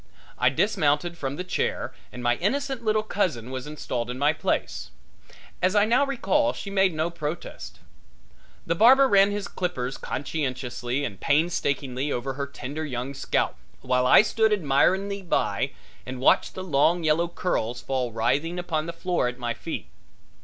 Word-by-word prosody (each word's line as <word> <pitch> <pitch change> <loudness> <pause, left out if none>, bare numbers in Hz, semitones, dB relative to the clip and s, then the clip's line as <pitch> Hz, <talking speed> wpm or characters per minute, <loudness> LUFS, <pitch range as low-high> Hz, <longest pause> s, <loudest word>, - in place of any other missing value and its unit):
I 125 - +5
dismounted 150 +1 +1
from 140 -4 -4
the 180 - -4
chair 185 - -2 0.2
and 125 - -8
my 120 0 +2
innocent 270 +5 -1
little 215 -1 +2
cousin 155 - -1
was 130 +1 -5
installed 125 -5 -4
in 125 - -4
my 145 +3 +3
place. - - -2 0.7
As 185 +2 +2
I 205 0 +5
now 250 +5 +3
recall 290 +2 +1
she 200 - -7
made 190 -1 +3
no 160 +2 -1
protest. 160 -1 -6 0.9
The 165 - +1
barber 260 +9 +6
ran 200 -4 +5
his 205 0 -3
clippers 135 -8 -3
conscientiously 130 -2 -3
and 100 -8 -6
painstakingly 140 - 0
over 130 +2 -2
her 140 +1 -4
tender 140 +3 -6
young 130 -2 -4
scalp, 135 - -1 0.2
while 125 0 +1
I 195 - +8
stood 220 0 +2
admiringly 195 +4 +2
by 180 - 0 0.3
and 130 0 -6
watched 130 - +3
the 185 - -5
long 170 +1 +2
yellow 160 +2 +2
curls 125 -9 -2
fall 125 -1 -2
writhing 140 +10 0
upon 165 -3 -2
the 170 - -4
floor 175 -4 0
at 125 0 -4
my 120 -2 -2
feet. 115 - -6
155 Hz, 160 wpm, -25 LUFS, 130-190 Hz, 0.9 s, I